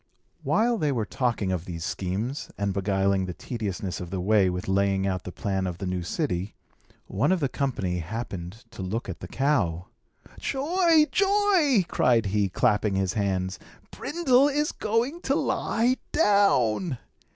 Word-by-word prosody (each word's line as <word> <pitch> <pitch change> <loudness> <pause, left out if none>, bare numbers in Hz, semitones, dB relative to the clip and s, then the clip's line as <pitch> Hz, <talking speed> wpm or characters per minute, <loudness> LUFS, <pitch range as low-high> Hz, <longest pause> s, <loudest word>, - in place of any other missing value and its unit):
While 230 0 +2
they 150 -2 +1
were 115 -5 -1
talking 115 -5 -1
of 90 -2 -2
these 85 -2 -6
schemes, 105 +9 -3
and 100 -1 -1
beguiling 95 -1 +1
the 90 - -5
tediousness 100 -6 -4
of 90 - -6
the 95 +1 -3
way 100 0 +3
with 90 0 -4
laying 95 0 +1
out 95 -2 -2
the 90 - -5
plan 95 0 -2
of 90 -1 -4
the 95 - -5
new 90 -1 -2
city, 95 - -2 0.5
one 105 - 0
of 190 - +2
the 145 - +1
company 100 -11 -2
happened 95 +1 -6
to 110 - -8
look 100 +5 -3
at 95 - -6
the 90 - -7
cow. 100 - 0 0.5
"Joy! 325 +3 +3
joy!" 390 - +3
cried 120 -3 +2
he, 100 0 +1
clapping 105 +2 +1
his 95 -1 0
hands. 95 -2 -1 0.3
"Brindle 280 -5 +2
is 295 +1 0
going 240 +10 -1
to - - 0
lie 245 +3 +1
down." 185 - +3
105 Hz, 160 wpm, -26 LUFS, -, 0.5 s, way